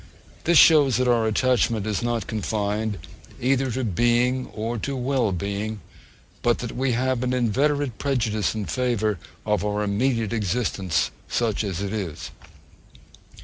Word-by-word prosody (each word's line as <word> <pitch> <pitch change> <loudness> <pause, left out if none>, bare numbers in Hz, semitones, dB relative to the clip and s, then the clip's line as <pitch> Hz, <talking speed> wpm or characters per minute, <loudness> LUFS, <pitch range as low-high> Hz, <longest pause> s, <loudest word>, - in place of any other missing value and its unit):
This 170 0 +5
shows 145 -8 +6
that 130 0 +1
our 115 -2 +3
attachment 120 -2 +1
is 105 -2 -1
not 120 -4 -1
confined 105 0 -2 0.4
either 135 +1 +1
to 130 +2 -2
being 120 +5 +1
or 115 +2 -4
to 140 +5 -3
well 130 -4 0
being; 100 +4 -3 0.6
but 120 -1 +2
that 120 - -6
we 130 0 0
have 130 +1 0
an 125 0 0
inveterate 130 +2 0
prejudice 110 -7 0
in 105 -2 -3
favour 110 -6 0 0.3
of 105 -1 +1
our 105 0 -1
immediate 115 +2 0
existence, 100 -4 0 0.2
such 115 -3 0
as 100 -2 -3
it 100 - -3
is. 90 -8 -5
115 Hz, 145 wpm, -24 LUFS, 105-125 Hz, 0.6 s, shows